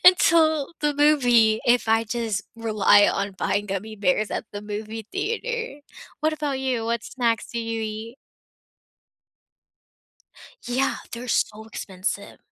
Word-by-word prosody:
until 320 -5 +5
the 295 -1 +1
movie, 245 -7 +4
if 240 -1 +3
I 225 0 +3
just 225 -3 -2
rely 215 -2 +4
on 200 0 -1
buying 205 +2 0
gummy 205 +3 -4
bears 200 +1 +1
at - - -3
the 205 0 -6
movie 215 +1 -6
theater, 460 -1 -3 0.4
what 310 +1 +2
about 295 -3 -2
you, 255 -4 -1
what 235 0 -1
snacks 235 -3 -1
do 235 - -2
you 230 -1 -3
eat? 220 +3 -6 2.5
Yeah, 255 +2 0
they're 245 +1 -6
so 220 -1 0
expensive. 200 -1 -5
230 Hz, 130 wpm, -24 LUFS, 215-275 Hz, 2.5 s, until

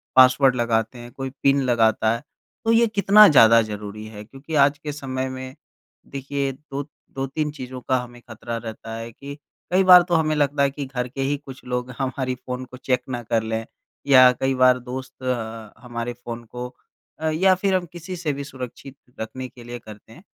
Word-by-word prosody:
Password 130 0 +6
लगाते 115 0 0
हैं, 120 0 -10
कोई 135 +2 -5
पिन 140 0 +4
लगाता 115 -3 +2
है। 115 - -8 0.4
तो 225 - +3
ये 230 +1 +5
कितना 210 0 +7
ज़्यादा 115 - +7
ज़रूरी 105 0 -6
है 105 -1 -9
क्योंकि 135 +8 -8
आज 145 +1 +2
के 150 +1 -6
समय 130 -2 -4
में 130 0 -7 0.5
देखिए, 140 0 -3
दो 140 +1 -7 0.3
2-3 135 +3 -2
चीज़ों 130 -3 -8
का 130 - +4
हमें 120 0 -10
खतरा 115 +1 -6
रहता 115 0 -7
है 115 +1 -6
कि 140 +5 -9 0.4
कई 185 +2 +4
बार 180 -1 +9
तो 175 - +3
हमें 155 -1 +2
लगता 145 -1 +2
है 140 - +3
कि 140 0 -5
घर 125 -2 -3
के 135 +2 -6
ही 140 +2 +1
कुछ 135 -2 -12
लोग 125 0 -3
हमारी 130 -1 -2
फ़ोन 125 0 -6
को 125 - -12
चेक 125 -1 0
ना 120 -2 -3
कर 115 0 0
लें 110 0 -3 0.4
या 130 -2 +8
कई 135 0 +2
बार 130 0 +5
दोस्त 130 +1 -8
अ, 115 -4 -4
हमारे 120 0 -4
फ़ोन 120 -1 -8
को 125 +2 -6 0.5
अ, 160 0 0
या 185 +4 +4
फिर 190 +1 +1
हम 185 -1 0
किसी 175 +2 -7
से 165 -4 -2
भी 140 +1 -5
सुरक्षित 135 0 -9 0.2
रखने 130 +4 -5
के 125 -1 -15
लिए 120 +1 -7
करते 110 -1 -14
हैं, 170 - -16
130 Hz, 200 wpm, -23 LUFS, 120-140 Hz, 0.5 s, बार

